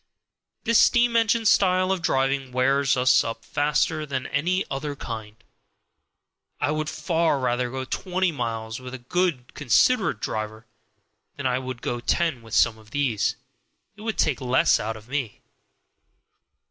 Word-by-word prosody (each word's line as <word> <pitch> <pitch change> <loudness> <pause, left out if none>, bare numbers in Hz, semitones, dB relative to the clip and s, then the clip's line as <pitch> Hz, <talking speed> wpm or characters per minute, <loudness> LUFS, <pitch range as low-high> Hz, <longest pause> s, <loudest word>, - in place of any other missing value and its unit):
This 230 0 +4
steam 240 -1 +4
engine 230 0 +2
style 185 -2 +3
of 190 -2 -1
driving 135 -4 0
wears 135 +1 +2
us 130 0 +4
up 115 0 -6
faster 150 +2 0
than 135 -3 -3
any 180 +7 0
other 145 +1 -4
kind. 110 -5 -7 1.2
I 145 0 0
would 155 0 -2
far 165 -3 0
rather 125 -1 0
go 130 +1 -4
twenty 185 +5 -1
miles 115 -4 -4
with 130 0 -8
a 120 -2 -12
good 170 -6 -1
considerate 145 - +2
driver 110 +1 -4 0.7
than 140 - -7
I 130 0 +1
would 130 -2 -7
go 120 - -2
ten 155 +1 0
with 115 -1 -6
some 110 -2 +3
of 110 -1 -18
these; 130 -5 0 0.6
it 210 - -14
would 220 0 -3
take 145 -4 +1
less 130 0 +3
out 110 +1 -3
of 110 +1 -15
me. 130 -5 -4
135 Hz, 150 wpm, -24 LUFS, 120-165 Hz, 1.2 s, This